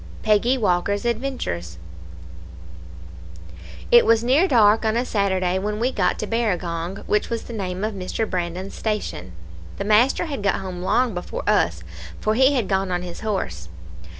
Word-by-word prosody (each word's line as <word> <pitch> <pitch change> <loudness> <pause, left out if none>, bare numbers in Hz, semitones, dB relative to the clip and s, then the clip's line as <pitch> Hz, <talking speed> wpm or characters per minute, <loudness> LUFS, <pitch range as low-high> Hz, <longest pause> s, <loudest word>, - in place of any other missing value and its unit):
Peggy 220 +4 +3
Walker's 200 0 0
Adventures 230 - -3 2.1
"It 240 - +8
was 230 0 +3
near 275 +10 +4
dark 220 - +4
on 220 +1 +1
a 245 - 0
Saturday 190 -4 0
when 210 +2 -3
we 245 +3 +1
got 185 -7 0
to - - -3
Barragong, 185 -5 -2
which 210 - 0
was 230 -1 -3
the 235 - -9
name 190 -2 -4
of 215 0 -1
Mr. 195 +3 -3
Brandon's 180 +1 -4
station. 210 - -4 0.4
The - - -3
master 225 +10 +3
had 285 -9 -4
got 200 -1 +1
home 185 -2 -6
long 240 +5 +1
before 175 0 -5
us, 85 - +2 0.4
for 215 - 0
he 265 +4 +4
had 240 -7 0
gone 190 -1 0
on 180 -1 -2
his 175 -1 -7
horse. 90 - -3
205 Hz, 160 wpm, -22 LUFS, 180-230 Hz, 2.1 s, It